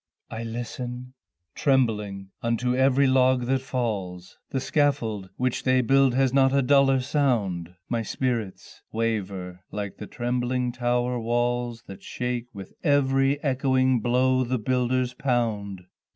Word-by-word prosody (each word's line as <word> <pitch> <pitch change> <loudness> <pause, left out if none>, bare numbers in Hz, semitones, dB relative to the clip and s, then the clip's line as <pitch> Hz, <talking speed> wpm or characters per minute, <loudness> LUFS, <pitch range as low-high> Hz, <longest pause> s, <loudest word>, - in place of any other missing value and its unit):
I 110 - -5
listen 125 +2 -6 0.4
trembling 105 -8 0
unto 120 +2 0
every 135 +1 +4
log 130 -1 +3
that 130 +1 +1
falls, 100 -9 -4
The 135 - -1
scaffold, 115 -9 0
which 125 -1 0
they 130 0 +3
build, 135 +1 +3
has 135 -1 +2
not 135 0 +4
a 140 - +3
duller 135 0 +4
sound, 110 - 0
My 115 -1 -1
spirits 115 -4 -3
waver, 100 -5 -3
like 105 -1 -5
the 105 - -8
trembling 125 +1 -1
tower 120 0 0
walls 120 0 -1
that 95 - -10
shake 125 -1 -3
with 100 -3 -10
every 135 -1 +2
echoing 130 -2 +2
blow 130 +3 +2
the 125 +1 -1
builders 125 +2 0
pound. 110 -8 -1
125 Hz, 130 wpm, -25 LUFS, 110-130 Hz, 0.4 s, every